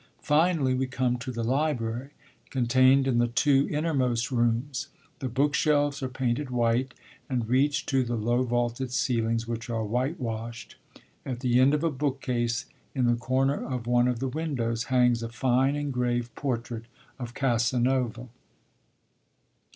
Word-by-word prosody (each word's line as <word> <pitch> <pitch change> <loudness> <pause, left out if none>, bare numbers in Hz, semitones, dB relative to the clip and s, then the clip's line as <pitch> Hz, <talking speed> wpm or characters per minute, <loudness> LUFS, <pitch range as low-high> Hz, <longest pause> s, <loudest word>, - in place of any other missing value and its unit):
Finally, 150 -3 +3
we 130 +1 0
come 130 -1 0
to 125 +2 -5
the 115 -1 -3
library, 130 -1 -1 0.4
contained 130 +2 +4
in 120 -3 +2
the 120 - +3
two 135 +3 +3
innermost 130 -7 0
rooms. 120 +2 0 0.3
The 130 - -3
book 140 +4 +1
shelves 145 -1 +2
are 130 - -2
painted 130 +1 -2
white, 120 +1 0 0.3
and 125 -4 -1
reach 135 +4 +2
to 135 -2 +1
the 120 0 -2
low 120 +3 +1
vaulted 120 +1 -1
ceilings, 115 -3 0
which 115 0 -5
are 115 -2 -1
white 125 +9 -1
washed. 115 -1 -5 0.5
At 125 -2 -5
the 125 -1 +3
end 135 +3 +5
of 150 - -2
a 165 - +2
bookcase, 130 -4 -1 0.3
in 130 -2 +1
the 120 - +4
corner 130 +4 0
of 125 -3 -4
one 120 0 +3
of 125 -1 0
the 135 +3 -2
windows, 125 -6 -2
hangs 125 -2 +3
a 115 - -4
fine 130 +3 +1
engraved 125 -4 -1
portrait 120 -4 -3 0.3
of 120 -1 -6
Casanova. 125 -1 0
125 Hz, 150 wpm, -27 LUFS, 120-135 Hz, 0.5 s, end